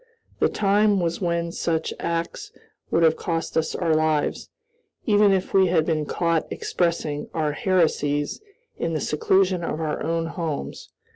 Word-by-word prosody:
The - - +3
time 205 0 +2
was 170 0 -1
when 170 -1 -1
such 165 -1 -1
acts 170 0 -3 0.4
would 165 - +2
have 160 -1 +5
cost 165 -1 -3
us 160 -1 0
our 165 -3 +1
lives, 155 -1 0 0.6
even 205 -2 +4
if 190 -1 0
we 190 -1 +5
had 165 -3 +2
been 155 -3 -1
caught 170 -2 0
expressing 165 -4 -2
our 155 -2 0
heresies 150 - 0 0.4
in 165 -1 -1
the - - 0
seclusion 185 +5 +1
of 160 - -3
our 155 -2 -2
own 165 +1 -1
homes. 165 -3 -5
165 Hz, 150 wpm, -24 LUFS, 155-180 Hz, 0.6 s, have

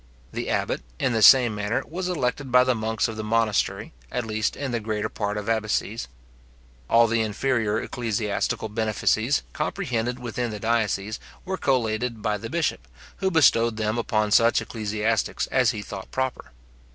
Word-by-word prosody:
The - - -3
abbot, - - -1 0.2
in 130 - 0
the 110 - +1
same 120 +1 +8
manner, 105 +2 -1
was 180 +3 -4
elected 135 -4 -2
by 125 0 +7
the 130 0 +2
monks 110 -1 -1
of 110 -1 -6
the 110 - -3
monastery, 110 -2 0 0.2
at 125 - -2
least 110 0 -1
in 140 -3 -4
the 120 - 0
greater 110 -1 -2
part 105 -1 -3
of 105 - -5
abbacies. 110 - -1 0.8
All 115 0 +6
the 115 0 +1
inferior 110 0 0
ecclesiastical 110 -2 -2
benefices 110 +3 +1
comprehended 125 - -2
within 120 0 -3
the 105 -1 -6
diocese 110 -2 0 0.3
were 190 0 -2
collated 120 -6 0
by 105 -2 0
the 115 - -6
bishop, 160 - -1 0.3
who 190 - 0
bestowed 115 -9 +4
them 110 +1 -1
upon 110 -2 0
such 115 +2 +5
ecclesiastics 110 0 -1
as 130 -3 +4
he 105 -4 -3
thought 95 -1 -8
proper. 130 -1 -3
115 Hz, 165 wpm, -25 LUFS, 110-125 Hz, 0.8 s, same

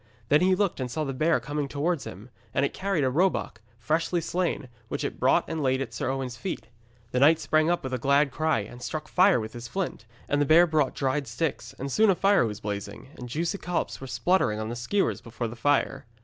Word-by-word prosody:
Then 150 - +5
he 185 +1 +4
looked, 195 -5 0
and 130 -1 -2
saw 155 +5 -2
the 135 -2 -3
bear 155 +3 +2
coming 145 +3 -3
towards 145 +2 -1
him, 105 +7 -10 0.2
and 140 - +3
it - - -3
carried 190 -5 -1
a 130 - +2
roebuck, 165 - 0 0.2
freshly 160 +9 0
slain, 170 -4 -2 0.2
which - - -3
it - - -4
brought - - +3
and 160 -1 -3
laid 130 -1 +1
at 135 - -4
Sir - - -2
Owen's 130 -2 -3
feet. 185 - -5 0.4
The 125 - +1
knight 155 +4 +6
sprang 155 0 +2
up 175 - 0
with 130 -1 -4
a 130 - -1
glad 140 +3 +3
cry, 155 -5 +1
and 120 +4 -10
struck 155 +4 -4
fire 185 -4 +4
with 110 0 -6
his 120 0 -7
flint, 185 - -4 0.2
and 145 0 +1
the - - +3
bear 165 +4 +7
brought 155 -5 +1
dried 135 0 -1
sticks, 130 +7 -3
and 135 +1 -4
soon 220 - +4
a 190 - +4
fire 195 - +3
was 105 -2 -6
blazing, 105 +4 -5
and 125 -1 -8
juicy 165 +8 -2
collops 180 -5 -3
were 135 - -6
spluttering 175 - +1
on 110 +2 -3
skewers 155 +13 0
before 120 0 -4
the 115 - -8
fire. 135 0 0
140 Hz, 230 wpm, -27 LUFS, 125-165 Hz, 0.4 s, bear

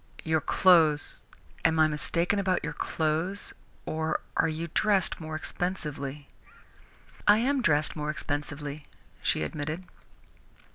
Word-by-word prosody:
Your 160 -1 +1
clothes 160 -6 +4 0.4
am 165 -1 +3
I 155 0 +6
mistaken 170 +5 0
about 185 -2 +1
your - - -3
clothes 165 +5 -1 0.3
or 160 0 -1 0.2
are - - +3
you 160 +1 -3
dressed 200 -5 +2
more 155 0 -5
expensively?" 150 -5 -3 1.0
"I 210 - +8
am 265 +4 +1
dressed 155 -7 +2
more 150 -1 -3
expensively," 145 -1 -3 0.3
she 80 - +1
admitted. 150 - -4
160 Hz, 115 wpm, -28 LUFS, 150-180 Hz, 1.0 s, I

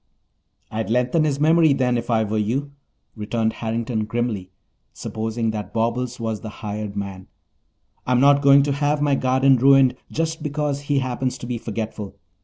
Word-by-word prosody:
"I'd 110 0 -3
lengthen 125 +7 +2
his 140 -2 -1
memory, 160 0 +4
then, 125 -2 +1
if 120 0 -3
I 110 -2 +2
were 110 0 -1
you," 130 +7 -1 0.4
returned 110 +1 -1
Harrington 115 -1 -2
grimly, 115 -5 -3 0.4
supposing 110 +1 -3
that 105 -2 -6
Bobbles 120 +2 -1
was 110 -2 -3
the 110 - -6 0.2
hired 105 -1 -4
man. 100 -2 -6 0.8
"I'm 125 -1 +3
not 140 +1 +5
going 140 0 +6
to 145 - 0
have 145 +1 0
my 145 -1 +2
garden 130 0 +3
ruined 135 0 +5 0.2
just 160 0 -2
because 150 -1 -2
he 145 - +2
happens 130 -1 -2
to 120 - -8
be 120 -1 -3
forgetful. 110 -2 -5
125 Hz, 165 wpm, -22 LUFS, 110-140 Hz, 0.8 s, going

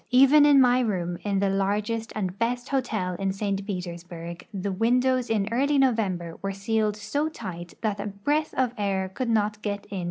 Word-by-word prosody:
Even 275 +4 +7
in 285 -2 +7
my 250 -1 +5
room, 180 -7 -1
in 200 -1 -1
the 195 0 +2
largest 210 +4 -1
and 195 -2 -3
best 245 +2 -1
hotel 225 -9 -1
in 195 -1 0
St. 195 0 -2
Petersburg, 175 -2 -6
the 200 -1 -3
windows 250 +5 +2
in 210 -3 +1
early 280 +5 +2
November 200 -10 +1
Avere 195 0 -2
sealed 215 +1 0
so 285 +9 -1
tight 180 - -8
that 210 -2 -1
a 205 - -3
breath 290 +11 -1
of 255 -2 +1
air 190 -2 0
could 235 +6 -3
not 215 -1 +1
get 205 -1 -3
in. 195 - -3
210 Hz, 185 wpm, -26 LUFS, 195-245 Hz, -, Even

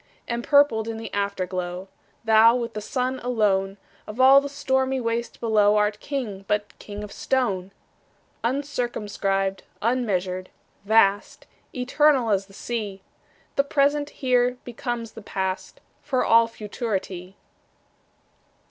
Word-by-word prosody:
Empurpled 235 -1 +3
in 225 -1 -4
the 225 0 -7
Afterglow, 185 -2 -3 0.4
Thou, 225 +1 +6
with 235 -2 -3
the 215 - -4
Sun 255 +4 -2
alone, 200 -5 +1 0.3
Of 215 +3 -8
all 270 +2 +8
the 285 - -5
stormy 265 -2 0
waste 235 0 -3
below, 210 -2 +3
Art 210 0 +1
King, 225 -9 -4
but 210 0 -1
king 205 0 -7
of 210 - -8
stone! 195 -8 -1 0.7
Uncircumscribed, 220 -7 -1 0.2
unmeasured, 195 -6 -1 0.4
vast, 205 -2 +2 0.3
Eternal 260 -1 +2
as 195 -1 +1
the 195 - -18
Sea, 205 -3 -5 0.5
The 275 - +5
present 285 +1 +1
here 250 -3 +1
becomes 240 -1 -4
the 225 - -11
past, 190 -2 -4 0.2
For 265 -4 0
all 230 0 +5
futurity. 200 -4 -5
225 Hz, 120 wpm, -24 LUFS, 200-250 Hz, 0.7 s, all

